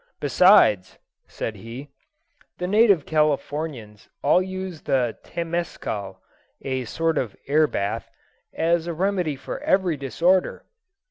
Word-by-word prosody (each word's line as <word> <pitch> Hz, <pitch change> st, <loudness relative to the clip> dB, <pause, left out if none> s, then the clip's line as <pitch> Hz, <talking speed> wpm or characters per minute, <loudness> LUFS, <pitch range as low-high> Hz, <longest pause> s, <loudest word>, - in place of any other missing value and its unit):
Besides," 145 Hz, -, +4 dB, 0.3 s
said 110 Hz, -2 st, -5 dB
he, 120 Hz, +7 st, -9 dB, 0.7 s
"the 180 Hz, -, -3 dB
native 200 Hz, -4 st, +4 dB
Californians 145 Hz, -7 st, -2 dB
all 180 Hz, -, +4 dB
use 185 Hz, -3 st, -6 dB
the 130 Hz, -5 st, 0 dB
Temescal 165 Hz, -, -4 dB, 0.5 s
(a 130 Hz, -2 st, -2 dB
sort 165 Hz, +6 st, 0 dB
of 115 Hz, -6 st, -4 dB
air 150 Hz, +2 st, +3 dB
bath) 100 Hz, -7 st, -3 dB, 0.4 s
as 170 Hz, +1 st, 0 dB
a 170 Hz, -, -2 dB
remedy 180 Hz, -4 st, 0 dB
for 135 Hz, -, -7 dB
every 185 Hz, -5 st, +1 dB
disorder." 170 Hz, +7 st, +1 dB
155 Hz, 115 wpm, -23 LUFS, 130-180 Hz, 0.7 s, Besides